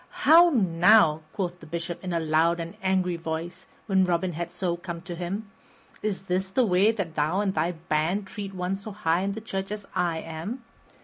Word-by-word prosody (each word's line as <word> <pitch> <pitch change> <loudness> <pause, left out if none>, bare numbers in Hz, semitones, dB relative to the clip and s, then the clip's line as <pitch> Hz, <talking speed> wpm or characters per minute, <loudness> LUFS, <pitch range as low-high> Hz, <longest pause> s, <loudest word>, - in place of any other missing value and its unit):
"How 340 +2 +8
now," 180 - +4
quoth 180 -3 -3
the - - -13
Bishop 170 +2 -5
in 185 - -3
a 170 - +1
loud 160 +2 +2
and 165 0 -5
angry 185 -2 +1
voice, 165 +1 -5 0.2
when 190 -3 +3
Robin 180 0 0
had 170 +2 -4
so 175 -2 -1
come 170 -1 -7
to 180 - -6
him, 195 +5 -5 0.5
"is 205 -3 -2
this 190 0 -1
the 250 +6 +2
way 195 +2 +4
that 195 -8 -4
thou 155 +5 +1
and 200 -2 0
thy 165 +2 0
band 165 +4 -1
treat 195 0 -7
one 180 +1 -1
so 200 +3 -8
high 180 -4 0
in 200 +1 -1
the 220 - -6
church 195 -2 -4
as 210 -1 -5
I 175 -3 +1
am? 165 +11 -6
180 Hz, 200 wpm, -26 LUFS, 170-195 Hz, 0.5 s, How